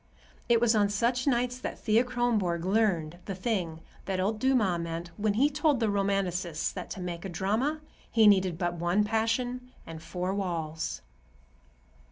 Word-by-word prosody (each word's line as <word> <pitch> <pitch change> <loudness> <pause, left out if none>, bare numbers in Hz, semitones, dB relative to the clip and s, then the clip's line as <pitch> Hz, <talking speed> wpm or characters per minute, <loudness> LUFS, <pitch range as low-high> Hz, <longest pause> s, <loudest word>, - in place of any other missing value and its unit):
It 235 -1 +5
was 235 -1 +4
on 205 -2 +3
such 240 +5 0
nights 250 -1 +1
that - - -5
Thea 220 +2 +3
Kronborg 225 -9 0
learned 185 -6 +1
the 195 - -4
thing 180 -5 -2 0.2
that 190 -1 -2
old 210 +3 0
Dumas 225 -9 +2
meant 170 +1 -5
when 205 +1 0
he 265 +6 +4
told 295 -2 +1
the 225 -3 +1
Romanticists 190 -4 -1
that 180 - -7
to - - -6
make 175 -2 -5
a 195 - -5
drama 220 - -1 0.3
he 225 -1 +4
needed 190 -4 +4
but 175 0 -1
one 175 +4 +1
passion 245 +3 -1
and 160 -1 -8
four 180 +3 -3
walls. 165 -5 -3
200 Hz, 165 wpm, -29 LUFS, 175-235 Hz, 0.3 s, It